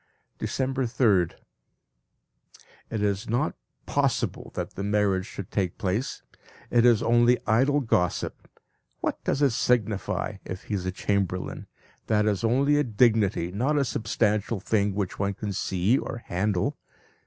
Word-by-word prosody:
December 130 -1 -1
3rd. 105 -8 +2 1.6
It 110 -2 -2
is 100 +2 -1
not 120 +2 +1 0.3
possible - - 0
that - - -3
the - - -6
marriage 100 -1 +1
should 100 -4 -8
take 95 -4 -1
place; 100 +7 -2 0.5
it 120 0 +5
is 115 -2 +4
only 120 +1 +4
idle 135 +7 +3
gossip. 90 -8 -1 0.5
What - - -2
does 145 - 0
it 140 - +4
signify 110 -3 0
if 95 0 -7
he - - -6
is 95 -2 -2
a - - 0
chamberlain! 95 -1 -2 0.4
That 105 -1 +2
is 105 0 0
only 135 +6 +3
a 145 - +3
dignity, 105 -7 +2
not 130 +10 0
a 140 - +2
substantial 110 -2 0
thing 100 0 0
which 100 -3 -3
one 100 0 0
can 105 0 -4
see 95 +7 +1
or 115 - -6
handle. 90 0 -1
105 Hz, 140 wpm, -26 LUFS, 100-120 Hz, 1.6 s, it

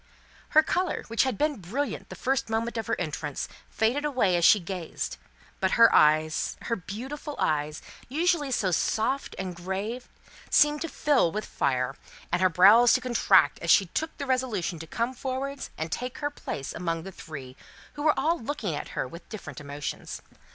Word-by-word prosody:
Her 310 - +9
colour, 360 +1 -1
which 230 +3 +2
had 260 -6 -1
been 300 -4 0
brilliant 255 +11 -3
the - - -7
first 265 -3 -1
moment 225 +1 -1
of 225 -2 -3
her - - -1
entrance, 150 -4 -3 0.2
faded 240 +7 +1
away 250 -11 +2
as 170 - +1
she 210 - +7
gazed; 175 -2 -5 0.4
but 190 -1 +1
her 230 0 +7
eyes 155 +1 +3
her 230 - -1
beautiful 265 - -6
eyes 150 0 -1 0.3
usually 315 0 +1
so 200 -7 +1
soft 225 +9 0
and 185 -2 -4
grave, 195 +8 -4 0.4
seemed 295 0 +4
to 330 - -2
fill 280 - +2
with 215 +4 -3
fire, 130 0 -1 0.4
and 175 +1 +1
her 185 - +5
brows 205 +8 +7
to - - +3
contract, 250 -2 +3
as - - -5
she 195 - +6
took 315 - -4
the 280 - -4
resolution 240 - -1
to 165 - -8
come 235 +8 -2
forward 270 +2 -4
and 160 +1 -4
take 250 +7 -4
her 290 0 -2
place 140 - -5
among 165 -2 -2
the 195 - -7
three, 140 -7 -9 0.4
who 290 - -7
were 305 0 +3
all 335 +2 +1
looking 225 - -3
at 145 - -4
her - - 0
with 170 +5 -12
different 155 - -8
emotions. 145 0 -6
220 Hz, 180 wpm, -27 LUFS, 170-270 Hz, 0.4 s, Her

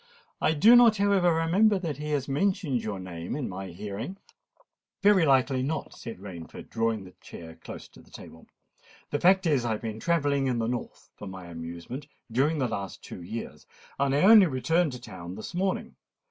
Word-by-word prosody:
I 160 - +2
do 220 +11 +7
not, 235 -3 +7
however, 195 -3 +3
remember 180 +6 +3
that 165 -7 -4
he 150 +1 -5
has 145 -3 -1
mentioned 145 - 0
your 100 -3 -4
name 90 +1 -6
in 145 -3 -3
my 95 +1 -6
hearing." 105 - -6 0.9
"Very 195 -5 +5
likely 130 -1 +3
not," 140 +3 -3
said 115 - -8
Rainford, 90 -4 -10
drawing 115 -3 -1
a 90 - -12
chair 80 -1 -10
close - - -9
to - - -17
the - - -22
table. 80 - -13 0.6
"The 145 - 0
fact 190 +1 +4
is 145 -7 +2
I 115 -2 0
have 105 - -5
been 110 -1 -5
travelling 145 -3 +1
in 125 -2 0
the 115 - 0
north, 120 +1 -5
for 100 - -8
my 95 -1 -8
amusement, 85 - -7 0.2
during 140 +7 +2
the 130 -3 +1
last 100 -4 -5
two - - -9
years; 110 +7 -7 0.3
and 140 0 +2
I 145 - +2
only 205 -1 +8
returned 160 +3 +1
to 125 - -7
town 90 -4 -9
this 110 - -8
morning. 190 +2 -2
135 Hz, 190 wpm, -27 LUFS, 105-165 Hz, 0.9 s, only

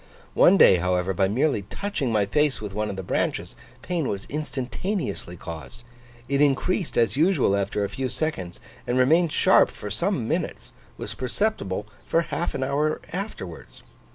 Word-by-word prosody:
One 190 - +6
day, 95 - +7
however, 90 +1 0
by 95 +1 +2
merely 125 +3 +1
touching 145 - -3
my 105 -2 +2
face 150 +6 +1
with 105 -2 -6
one 105 +1 -1
of 100 - -4
the 95 - -5
branches, - - -2 0.3
pain 170 -6 -1
was 100 -1 -3
instantaneously 145 - -3
caused; 80 - -9 0.4
it 140 +1 +1
increased 155 +6 +1
as 115 -3 +3
usual 165 - +3
after 100 +1 -1
a 100 - -1
few 130 -1 -3
seconds, 95 - -3 0.3
and 120 +1 +1
remaining 160 +7 +4
sharp - - +5
for 105 - -8
some 140 - 0
minutes, 165 +4 -3 0.3
was - - -5
perceptible 125 - -1 0.2
for 165 - +2
half 170 0 -3
an 130 - -1
hour 145 +3 0
afterwards. 180 - -7
130 Hz, 160 wpm, -25 LUFS, 100-160 Hz, 0.4 s, day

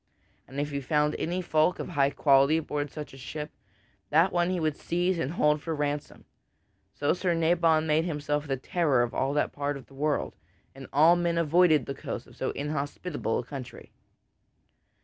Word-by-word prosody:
And 135 +2 -6
if 145 +1 -2
he 140 0 -3
found 150 +2 +1
any 180 +3 -2
folk 155 +2 +2
of - - -5
high 140 -5 +2
quality 140 +1 +4
aboard 150 -2 -3
such 150 -1 -8
a - - -11
ship, 150 +4 -6 0.6
that 165 +5 +3
one 175 0 +2
he 185 -1 -1
would 155 -2 0
seize 175 +3 -1
and 155 0 -2
hold 150 -3 +2
for 165 0 -3
ransom. 145 0 -3 0.7
So 145 - +1
Sir 180 -1 0
Nabon 165 -1 +3
made 160 +1 +2
himself 150 -2 -2
the 135 -1 -1
terror 140 -3 +1
of 120 - -3
all 135 +2 0
that 150 - 0
part 145 0 -2
of 135 - -12
the - - -20
world, 145 +2 -1 0.4
and 135 0 -10
all 160 +5 +6
men 170 -1 0
avoided 165 -3 +4
the 140 - -4
coasts 135 - -6
of - - -17
so - - -2
inhospitable 145 -2 -3
a - - -2
country. 130 0 -9
150 Hz, 190 wpm, -28 LUFS, 140-165 Hz, 0.7 s, all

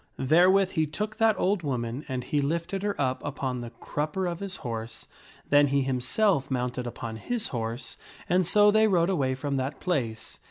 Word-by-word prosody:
Therewith 180 +7 +4
he 160 -4 +1
took 210 +8 -4
that 225 -1 +3
old 195 0 +1
woman 125 -2 -3
and 130 -2 -3
he 145 +4 0
lifted 170 +6 -2
her 205 0 -2
up 130 -2 0
upon 130 -3 -3
the 120 - -6
crup 150 +6 -4
per 190 -1 -1
of 175 -1 -3
his 195 -2 -5
horse; 115 -1 -5 0.4
then 145 0 +5
he 140 0 +1
himself 135 - +1
mounted 125 -1 -2
upon 115 -2 -6
his 230 - -2
horse, 115 +1 -4 0.3
and 180 0 +2
so 210 +1 +6
they 220 +1 +4
rode 180 -2 +2
away 135 -7 0
from 140 +1 -2
that 130 +3 -3
place. 125 -11 -2
145 Hz, 190 wpm, -27 LUFS, 130-185 Hz, 0.4 s, so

